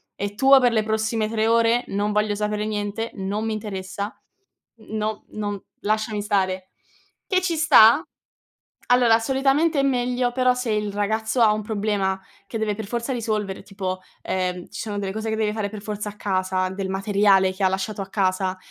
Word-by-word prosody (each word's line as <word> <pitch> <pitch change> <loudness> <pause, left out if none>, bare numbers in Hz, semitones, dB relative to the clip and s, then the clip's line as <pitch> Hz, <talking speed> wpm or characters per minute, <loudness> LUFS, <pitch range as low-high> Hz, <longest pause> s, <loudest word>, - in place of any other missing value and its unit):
è 205 0 -4
tuo 270 +4 +7
per 245 -2 +3
le 220 -2 +2
prossime 220 0 0
3 220 0 0
ore. 230 +1 +3
Non 205 +1 -1
voglio 210 0 +1
sapere 210 0 -1
niente, 210 +1 -3
non 200 +2 -3
mi 220 - -1
interessa, 200 -1 -5 0.8
no 215 0 -3
non 205 -2 -4 0.2
lasciami 215 0 -1
stare." 190 -3 -1 0.6
Che 370 -1 +1
ci 345 -2 0
sta. 295 -4 +7 0.9
Allora 245 -2 +5
solitamente 275 +6 +2
è - - +2
meglio, 250 -2 +1
però 255 0 +3
se 250 -2 -2
il 210 -1 -1
ragazzo 220 +4 -1
ha 215 -2 +6
un 215 - -2
problema 205 -2 -1 0.3
che 225 - -4
deve 215 -1 -1
per 220 0 -5
forza 235 +4 -2
risolvere 215 -5 -2
tipo, 185 -2 -4 0.2
ehm, 180 -1 -2
ci - - -6
sono 205 -2 -4
delle 195 -1 -3
cose 220 +1 -3
che 220 - -1
deve 215 -1 0
fare 210 -2 -2
per 210 0 -8
forza 210 0 -4
a 210 - -12
casa, 185 -2 0
del 190 0 -4
materiale 195 -1 +3
che 190 +1 -4
ha 190 - +5
lasciato 190 +2 -3
a 195 - -6
casa, 190 -1 0
210 Hz, 185 wpm, -23 LUFS, 200-225 Hz, 0.9 s, tuo